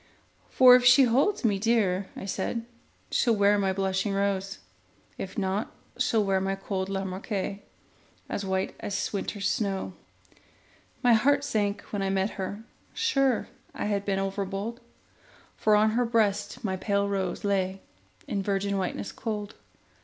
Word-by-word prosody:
For 250 -1 +8
if 250 - +4
she 255 +2 +7
holds 265 - +2
me 205 -3 +2
dear, 200 -4 +1
I - - -7
said, 215 +4 -3 0.5
She'll 235 -2 +3
wear 205 0 +4
my 195 -1 +1
blushing 190 +1 -1
rose; 195 -1 -1 0.6
If 190 - -6
not, 195 +1 -1 0.3
she'll 225 -4 +2
wear 195 -1 +1
my 195 0 -1
cold 195 -1 -3
Lamarque, 195 +1 -3 0.7
As 200 - -3
white 190 0 -1
as 200 +1 -3
winter's 200 0 -2
snows. 195 -3 -1 1.1
My 245 -1 +6
heart 280 +5 +3
sank 205 -6 -1
when 205 - -1
I 195 - 0
met 195 +1 0
her: 200 +2 -5 0.3
sure 275 - +1 0.3
I - - -3
had 205 -1 0
been 195 -1 -1
overbold, 195 +3 -3 0.8
For 215 -1 +3
on 215 +1 +4
her 245 +2 +1
breast 210 -3 0
my 190 -3 -1
pale 200 +1 0
rose 190 -2 -2
lay 195 -1 0 0.5
In 200 - -1
virgin 200 0 -1
whiteness 190 +2 -3
cold. 210 -2 -4
200 Hz, 145 wpm, -27 LUFS, 195-220 Hz, 1.1 s, For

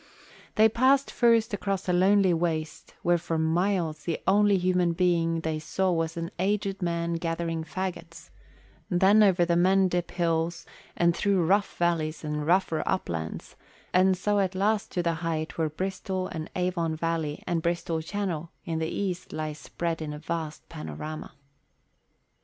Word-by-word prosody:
They 220 0 +6
passed 260 +5 +3
first 230 -3 +3
across 195 -1 -2
a 180 - +2
lonely 190 +1 +4
waste 160 -2 -2
where 175 0 +3
for 165 -1 -2
miles 165 -1 0
the 170 - -1
only 205 +1 +4
human 180 -1 +2
being 165 -2 +1
they 160 -1 -2
saw 190 +4 0
was 165 -1 -1
an 170 +1 -4
aged 195 0 0
man 170 -1 -1
gathering 165 -1 -2
faggots; 165 -1 -6 0.6
then 195 +3 +5
over 185 -4 +5
the 170 0 +1
Mendip 180 0 +3
Hills 165 -1 -1 0.3
and 170 -1 +3
through 195 -4 +2
rough 200 +4 +1
valleys 165 -3 0
and 150 -1 -3
rougher 175 -3 +2
uplands, 80 - -3 0.4
and 185 +1 +4
so 205 +3 +1
at 190 -1 0
last 205 +2 +1
to 175 - 0
the 170 -1 +1
height 165 -1 -3
whence 155 -1 -1
Bristol 190 0 -2
and 160 -3 -5
Avon 175 -3 0
Valley 160 -2 -2
and 170 -2 0
Bristol 170 -1 -1
Channel 170 -2 -3 0.2
in 165 -3 -2
the 160 0 -1
east 185 -3 -3
lie 155 -1 -3
spread 165 +2 -4
in 150 -1 -4
a - - -6
vast 160 0 -5
panorama. 80 - -7
170 Hz, 155 wpm, -27 LUFS, 160-190 Hz, 0.6 s, They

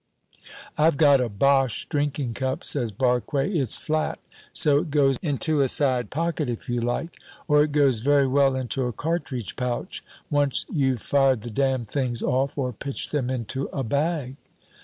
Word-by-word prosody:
"I've 155 -1 +4
got 145 -3 +5
a 125 - -1
Boche 135 +3 +1
drinking 145 -4 -2
cup," 130 +2 -3
says 120 -6 +1
Barque; 125 +5 0
"it's 140 - +1
flat, 155 0 -1 0.3
so 145 -1 +4
it 165 +1 -4
goes 140 -3 +2
into 150 -1 0
a 135 - +3
side 125 -5 0
pocket 160 -2 -2
if 120 - -5
you 120 -1 -1
like, 120 +8 -3 0.3
or 150 -2 +5
it 150 0 +1
goes 140 -5 +3
very 140 +3 +3
well 135 0 +3
into 130 0 -2
a 120 - -4
cartridge 145 - -3
pouch, 125 -1 -4 0.3
once 145 -2 +1
you've 130 -6 0
fired 135 -4 +2
the 120 +1 -7
damn 130 0 0
things 125 0 -2
off 135 +3 0
or 125 -3 -2
pitched 140 +5 -4
them 135 -4 -1
into 130 +2 -3
a 135 - -3
bag." 140 +1 -1
135 Hz, 170 wpm, -24 LUFS, 125-145 Hz, 0.3 s, got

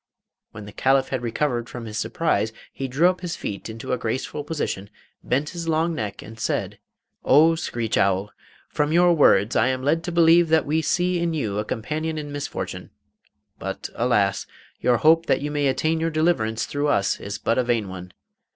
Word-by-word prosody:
When 105 -2 -9
the 105 - -10
Caliph 135 +5 +2
had 130 -2 -2
recovered 120 0 -1
from 120 -2 -7
his 105 -1 -7
surprise, 110 -1 0 0.2
he 135 - -4
drew 140 +7 +3
up 180 0 0
his 175 -2 -4
feet 100 +2 -6
into 115 +3 -5
a 125 - -1
graceful 130 +5 -3
position, 145 -10 -3 0.3
bent 140 +4 0
his 170 -2 -6
long 165 +1 +1
neck, 105 -9 -5
and 110 +1 -11
said: 110 - -2 0.4
'Oh, 155 +4 +6
screech 120 -9 -2
owl! 95 +1 +1 0.4
from 150 0 -1
your 175 +1 +5
words 115 - +4
I 110 - +3
am 130 0 -1
led 160 +4 +1
to 175 - -3
believe 170 0 +5
that 160 -2 +3
we 155 +3 +1
see 180 +3 +1
in 170 -1 -1
you 105 -9 -2
a - - 0
companion 155 +9 -3
in 145 -1 -5
misfortune. 145 0 -5 0.7
But, - - -5
alas! 105 -5 +1 0.3
your 125 -1 +3
hope 165 +5 +4
that - - +2
you 145 +1 -3
may 145 -1 +1
attain 155 +4 +1
your 165 +1 0
deliverance 155 -9 0
through 145 +1 -2
us 100 -9 +1
is 100 0 -5
but 115 - 0
a - - +3
vain 120 -4 0
one. 90 -1 -8
140 Hz, 195 wpm, -23 LUFS, 110-160 Hz, 0.7 s, Oh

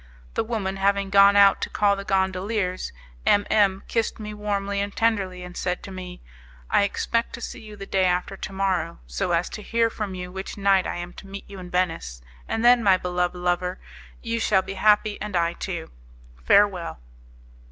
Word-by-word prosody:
The - - 0
woman 210 -4 -3
having 200 0 +1
gone 200 0 +7
out 200 -1 +6
to - - -2
call 205 -1 +2
the 195 - -6
gondoliers, 190 0 -1 0.3
M 205 0 +4
M 195 -2 +3
kissed 225 -1 -1
me 210 -1 -6
warmly 200 -1 -2
and 200 0 -4
tenderly, 195 -5 0
and 180 0 -9
said 180 -1 -2
to 195 - -8
me, 180 -1 -8 0.5
"I - - +5
expect 230 +3 0
to - - -6
see 240 - -6
you 215 -1 -10
the 195 -1 -8
day 190 -1 +1
after 180 +2 0
to 190 - -6
morrow, 190 -3 -1
so 185 -3 -2
as 170 +1 +1
to 210 - -7
hear 230 +1 +1
from 205 -4 -4
you 180 0 -6
which 190 +2 -6
night 195 -1 +3
I - - -3
am 175 0 -6
to - - -14
meet 195 +1 -8
you 200 -1 -10
in 180 -1 -9
Venice; 165 - -2 0.2
and 225 - -1
then, 245 0 +7
my 195 -4 +5
beloved 180 0 -1
lover, 180 +1 -1 0.5
you 230 -1 -1
shall 195 -4 +3
be 195 - -6
happy 210 +1 +3
and 210 -2 -4
I 170 0 +2
too. 175 -2 -5 0.5
Farewell." 195 - +3
195 Hz, 195 wpm, -24 LUFS, 180-205 Hz, 0.5 s, gone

